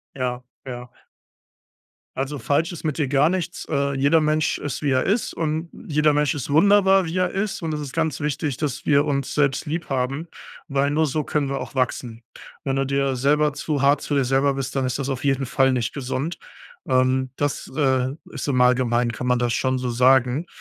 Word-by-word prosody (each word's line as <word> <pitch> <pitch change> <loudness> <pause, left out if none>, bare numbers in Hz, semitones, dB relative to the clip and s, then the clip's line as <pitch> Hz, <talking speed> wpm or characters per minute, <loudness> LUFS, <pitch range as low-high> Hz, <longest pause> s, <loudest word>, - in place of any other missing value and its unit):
Ja, 125 -1 -3 0.2
ja. 125 -1 -7 1.3
Also, 135 +2 -3
falsch 145 +8 0
ist 170 - -9
mit 155 -3 -2
dir 150 -4 0
gar 140 +3 +3
nichts. 180 -1 -3
Äh, 140 -2 0
jeder 140 +4 +4
Mensch 155 0 +1
ist, 145 -1 -5
wie 145 - 0
er 130 0 +2
ist, 210 +4 0
und 160 +1 -2 0.2
jeder 150 -1 +3
Mensch 150 -1 +1
ist 145 -1 -5
wunderbar, 195 +3 +5
wie 165 +2 -5
er 180 -1 +2
ist, 195 -1 -2
und 160 -1 -2
es 150 - -3
ist 145 -3 -6
ganz 160 -3 -1
wichtig, 145 -2 -2
dass 145 -3 -3
wir 145 -1 +4
uns 140 -2 -1
selbst 140 -3 +1
lieb 160 +2 -3
haben, 135 +5 -2 0.4
weil 140 -1 +1
nur 155 +2 +2
so 150 +2 -1
können 145 0 -1
wir 140 - -2
auch - - -8
wachsen. 125 -3 -2 0.4
Wenn 135 - 0
du 135 0 0
dir 140 -1 0
selber 150 +3 +2
zu 145 -1 -2
hart 140 +1 +4
zu - - -4
dir 135 - +2
selber 135 +2 +2
bist, 135 0 -4
dann 135 -1 +1
ist 130 +2 -2
das 135 - -2
auf 130 -2 -3
jeden 135 -1 +1
Fall 130 +1 +2
nicht 120 -2 -1
gesund. 140 +4 -3 0.5
Ähm, 130 0 +2
das, 145 0 -2
äh, 130 -3 +2 0.2
ist 145 - -5
im 130 -3 +1
Allgemeinen 125 -1 +3
kann 125 +3 -5
man 125 0 +3
das 120 -1 0
schon 130 +1 0
so 125 -1 -2
sagen. 130 +5 +3
140 Hz, 210 wpm, -23 LUFS, 130-150 Hz, 1.3 s, wunderbar